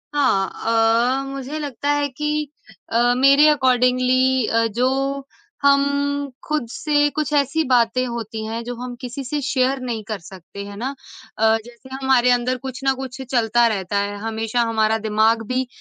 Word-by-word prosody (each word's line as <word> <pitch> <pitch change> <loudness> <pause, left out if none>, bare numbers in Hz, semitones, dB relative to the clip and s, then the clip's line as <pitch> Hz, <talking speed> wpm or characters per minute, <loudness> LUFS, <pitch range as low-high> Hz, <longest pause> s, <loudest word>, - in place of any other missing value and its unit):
हाँ 230 +1 +2
अ, - - -5
मुझे 275 +2 -5
लगता 285 -1 -4
है 290 0 +1
कि 300 +2 -2 0.4
अ, 240 +1 +3
मेरे 275 +3 +6
अकॉर्डिंगली 255 -2 +2
अ, 230 0 +2
जो 265 +4 -1 0.4
हम 280 0 +5 0.6
ख़ुद 305 -6 -1
से 290 0 +1
कुछ 305 0 -1
ऐसी 290 +2 +2
बातें 245 +1 +3
होती 225 -2 -5
हैं 225 +1 -4
जो 245 +1 -5
हम 245 +1 -7
किसी 255 +2 -6
से 290 +3 -3
शेयर 270 -1 0
नहीं 230 -4 -4
कर 210 0 -5
सकते 190 +2 -10
हैं 205 - -9
ना? 245 +5 -3 0.5
अ, 220 0 +4
जैसे 240 +1 -15
हमारे 250 -2 +4
अंदर 245 +1 +1
कुछ 260 0 -7
न 270 0 +3
कुछ 265 0 -7
चलता 240 -1 +3
रहता 200 -2 -2
है, 200 0 -2
हमेशा 225 +2 -2
हमारा 220 0 +2
दिमाग 220 +1 +1
भी 255 +1 -1
250 Hz, 165 wpm, -21 LUFS, 225-270 Hz, 0.6 s, मेरे